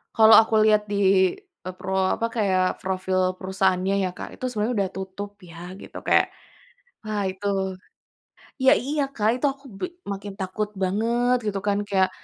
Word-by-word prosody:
Kalau 220 0 +8
aku 220 0 -1
lihat 215 -1 +4
di, 190 -2 +3 0.3
eee, 185 - -5
pro 190 0 -3 0.2
apa, 230 - -1
kayak 185 -4 +1
profil 185 0 0
perusahaannya 190 0 0
ya, 185 - 0
Kak, - - -6
itu 255 - -5
sebenarnya 225 0 -1
udah 195 -2 +1
tutup 190 +2 -6
ya 175 +1 -10
gitu - - -10
kayak, - - +4 0.8
wah, 210 -2 -2
itu 195 +2 -5 1.2
ya, 265 - +7
iya, 285 +3 -1
Kak, 215 -2 +1
itu - - 0
aku 275 0 -24
bi - - -1 0.3
makin 200 0 -6
takut 205 +3 -3
banget 235 +6 +1
gitu 200 -1 -1
kan 200 0 +2
kayak, 190 -2 +2
200 Hz, 160 wpm, -24 LUFS, 185-220 Hz, 1.2 s, Kalau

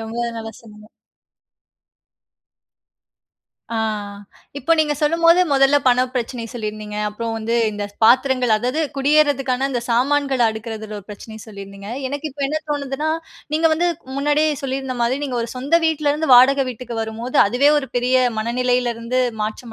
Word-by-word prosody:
ரொம்ப 225 +1 -7 0.2
நல்ல 225 0 -6
சொன்னீங்க. 215 -1 -15 2.8
ஆ 230 - -2 0.8
இப்போ 285 +5 +1
நீங்க 300 -1 +2
சொல்லும்போது, 335 +3 +4
மொதல 275 +1 +4
பண 250 0 +4
பிரச்சனை 240 -1 -3
சொல்லியிருந்தீங்க. 215 -2 -5
அப்புறம் 225 +2 -4
வந்து 225 +1 -2 0.2
இந்த 205 0 -4 0.2
பாத்திரங்கள் 255 0 +4
அதாவது 250 +7 -1 0.2
குடியேறுதற்கான 275 -2 +2
இந்த 245 -3 -1
சாமான்கள்ல 265 0 +2
அடுக்குறதுல 220 -1 -7
ஒரு 200 - -13
பிரச்சனைய 220 +1 -10
சொல்லியிருந்தீங்க. 200 -1 -10 0.2
எனக்கு 285 +3 -4
இப்போ 280 +1 -7
என்ன 305 +3 -1
தோணுதுனா? 285 +1 -2 0.4
நீங்க 320 +2 +3
வந்து 345 +3 0 0.3
முன்னாடியே 295 +2 +2
சொல்லியிருந்த 265 -1 -3
மாரி, 240 +3 +1
நீங்க 260 -3 -3
ஒரு 230 - -5
சொந்த 275 +6 -1
வீட்ல 305 -2 +1
இருந்து 315 +2 -2
வாடகை 270 +3 +6
வீட்டுக்கு 240 -1 -7
வரும்போது, 225 +3 -5
அதுவே 250 +7 +3
ஒரு 270 -2 -5
பெரிய 250 +1 +2 0.2
மனநிலையிலிருந்து 245 +1 0 0.2
மாற்றம் 220 +2 -5
250 Hz, 135 wpm, -20 LUFS, 225-280 Hz, 2.8 s, வாடகை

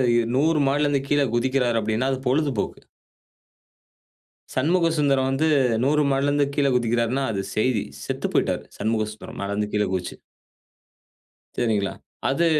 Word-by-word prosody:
இ - - +4 0.2
100 155 +2 +3
மாடில 145 +2 +2
இருந்து 140 -2 0
கீழ 145 0 +3
குதிக்கிறார்னா, 120 -2 +1
அப்படின்னா 110 +4 0
அது 135 - -1
பொழுதுபோக்கு. 135 -5 0 1.8
"சண்முகசுந்தரம் 150 -3 +2
வந்து 135 +4 +1 0.4
100 150 +3 +3
மாடில 135 +1 +1
இருந்து 145 0 +2
கீழ 140 -1 +2
குதிக்கிறார்ன்னா" 120 +2 +1
அது 100 - -1
செய்தி. 110 0 +1 0.2
"செத்து - - -3
போய்யிட்டாரு. - - 0
சண்முகசுந்தரம், 110 0 -3
மேல 100 0 -3
இருந்து 105 0 -2
கீழ 105 0 +2
குதிச்சு." 90 -2 -3 1.4
சரிங்களா? 105 -5 0 0.4
அது 140 +6 +2
130 Hz, 130 wpm, -23 LUFS, 110-145 Hz, 1.8 s, இ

